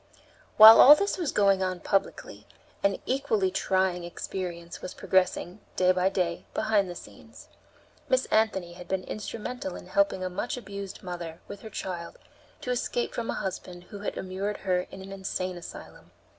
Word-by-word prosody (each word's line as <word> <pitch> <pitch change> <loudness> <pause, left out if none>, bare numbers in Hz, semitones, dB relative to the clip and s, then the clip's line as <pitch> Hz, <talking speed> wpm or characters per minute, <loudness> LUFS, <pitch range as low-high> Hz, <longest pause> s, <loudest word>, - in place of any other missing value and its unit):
While 220 +1 +11
all 290 +3 +11
this 400 +3 -1
was 330 -6 -1
going 195 -2 +3
on 185 -1 -1
publicly, 195 +2 -2 0.3
an 200 -1 +2
equally 245 -8 0
trying 185 -1 0
experience 175 -1 -6
was 185 - -7
progressing, 185 0 0 0.2
day 185 0 +4
by 185 +1 +2
day, 180 -3 -2
behind 215 -3 +1
the 175 - -6
scenes. - - -13 0.6
Miss - - +2
Anthony 195 -6 +1
had 175 0 -11
been 190 0 -2
instrumental 215 -1 -5
in - - -9
helping 200 0 +1
a - - -1
much 230 +7 -3
abused 200 -5 -8
mother, 175 -2 -6
with 200 - -9
her 220 - -9
child, 180 -4 -6 0.4
to 250 - -3
escape 245 0 -1
from 235 -1 -4
a - - -1
husband 180 -2 -5
who 205 - -7
had 205 - -4
immured 195 +2 -3
her 180 -1 +1
in 190 - -10
an 195 - -10
insane 185 -1 -3
asylum. 175 - -11
190 Hz, 170 wpm, -27 LUFS, 180-210 Hz, 0.6 s, While